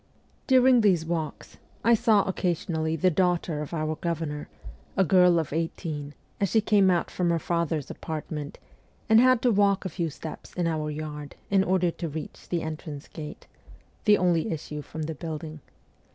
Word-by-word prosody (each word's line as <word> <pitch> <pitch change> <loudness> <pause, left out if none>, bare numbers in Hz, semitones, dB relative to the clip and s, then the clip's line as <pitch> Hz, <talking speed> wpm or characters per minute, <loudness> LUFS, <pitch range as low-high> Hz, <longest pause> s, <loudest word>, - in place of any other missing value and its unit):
During 255 -2 +6
these 185 -6 +3
walks, 160 -3 -4 0.3
I 235 - +5
saw 220 -3 +4
occasionally 165 -3 -1
the 180 +3 +2
daughter 175 -3 +1
of 150 - -6
our 155 -2 -1
governor, 160 -4 -3 0.5
a 195 - +5
girl 180 -1 +5
of 160 -3 -1
eighteen, 155 -3 -3 0.2
as 200 - +1
she 225 - +4
came 205 -3 +4
out 175 -2 +1
from 180 -1 0
her 170 - +2
father's 165 -3 -1
apartment 150 -2 -5 0.5
and 220 0 +6
had 255 -1 +4
to 245 - +4
walk 200 -2 +3
a - - -1
few 170 -1 -2
steps 155 +1 -9
in 175 - 0
our 155 -2 -1
yard 150 -1 -6 0.2
in 195 -1 +4
order 180 -2 +2
to 165 0 -5
reach 155 +1 -8
the 170 -2 -1
entrance 155 -2 -6
gate 150 -1 -8 0.6
the 210 -2 +6
only 180 +3 +1
issue 150 -1 -5
from 160 +2 -6
the 160 +1 -3
building. 155 0 -6
165 Hz, 170 wpm, -27 LUFS, 155-190 Hz, 0.6 s, During